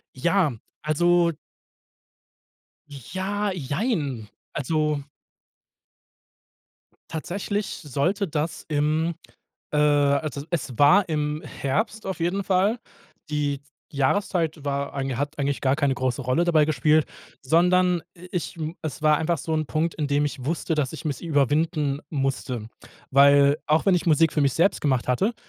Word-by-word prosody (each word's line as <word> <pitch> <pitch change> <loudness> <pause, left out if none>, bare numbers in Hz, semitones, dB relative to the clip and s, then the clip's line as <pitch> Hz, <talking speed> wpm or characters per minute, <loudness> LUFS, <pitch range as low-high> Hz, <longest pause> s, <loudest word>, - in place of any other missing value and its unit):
Ja, 170 +2 +2 0.3
also 170 +2 +3 1.6
Ja, 190 - -3
jein. 145 - -2 0.2
Also 150 0 0 2.1
tatsächlich 195 +5 -3 0.2
sollte 170 - 0
das 155 +1 -3
im 155 +2 0 0.6
äh, 150 - 0
also 145 -1 +2
e 145 - -11
es 135 -7 -3
war 180 +8 +6
im 150 0 -1
Herbst 215 - -2
auf 190 -1 -4
jeden 180 +4 0
Fall. 195 +5 +2 0.5
Die 145 -2 -1 0.3
Jahreszeit 160 +2 0
war 140 0 -2
eigen 135 -3 -3
hat 145 +1 -3
eigentlich 140 0 -1
gar 135 0 +2
keine 140 -2 +1
große 130 0 -1
Rolle 130 +6 +1
dabei 155 -3 +4
gespielt, 155 0 +3 0.4
sondern 180 +4 +3 0.2
i 180 +2 -12
ich 175 -2 -4 0.2
es 155 -1 -5
war 155 -1 +4
einfach 165 +2 0
so 160 - -3
'n 155 -1 0
Punkt, 160 +1 -1
an 150 - 0
dem 145 +1 +2
ich 135 -3 -5
wusste, 165 +1 -1
dass 150 -2 -1
ich 160 +1 -8
mich 145 -3 -3
überwinden 150 -1 +1
musste, 135 -5 -2 0.4
weil 140 +1 +6
auch 155 +1 +2
wenn 195 -2 +5
ich 180 - -1
Musik 160 -1 +4
für 150 - +1
mich 140 -2 +2
selbst 170 +4 +2
gemacht 130 -5 +1
hatte 190 - +1
155 Hz, 140 wpm, -24 LUFS, 140-170 Hz, 2.1 s, war